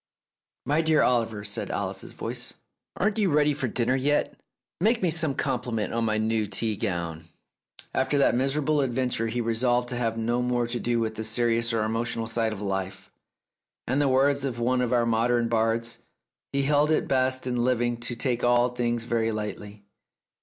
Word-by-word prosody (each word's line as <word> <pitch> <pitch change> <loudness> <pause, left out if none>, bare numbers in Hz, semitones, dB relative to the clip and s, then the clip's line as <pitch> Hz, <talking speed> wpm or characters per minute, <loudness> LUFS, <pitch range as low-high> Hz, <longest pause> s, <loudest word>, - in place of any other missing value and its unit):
"My 150 +3 +2
dear 160 -1 +3
Oliver," 115 -4 +1
said 105 0 -3
Alice's - - -4
voice, - - -6 0.4
"aren't 210 +3 +1
you 200 -3 +3
ready 150 -1 +3
for 135 -2 -2
dinner 120 +2 0
yet? 145 +3 0 0.4
Make 220 +4 +2
me 175 - +3
some 155 -3 +1
compliment 120 -5 -2
on 115 0 0
my 110 -1 +1
new 110 -1 0
tea 110 +1 -1
gown. 85 -6 -3 0.3
..." - - -65 0.3
After 135 +2 +1
that 140 - +4
miserable 140 +4 +1
adventure 125 -3 -1
he 120 +2 -2
resolved 120 +2 +1
to 125 - -3
have 115 -2 -1
no 120 +2 0
more 125 -1 0
to 120 +1 -3
do 120 0 0
with 110 -1 -1
the 110 - -5
serious 115 +1 +1
or 115 -2 0
emotional 115 +1 -1
side 115 0 0
of 105 -2 -6
life, 95 -1 -4 0.7
and - - -2
in - - +2
the 145 - +3
words 135 +1 +3
of 130 -4 -2
one 125 +2 +1
of 125 - -1
our 120 -1 +3
modern 115 +1 +2
bards 115 0 0 0.5
"he 140 0 0
held 145 +2 +3
it 155 - +1
best 130 -1 +1
in 125 -2 0
living 120 -1 +1
to 120 +1 -1
take 120 0 -1
all 120 0 +4
things 120 -1 -1
very 115 -1 0
lightly." 105 -1 -6
120 Hz, 190 wpm, -26 LUFS, 115-130 Hz, 0.7 s, that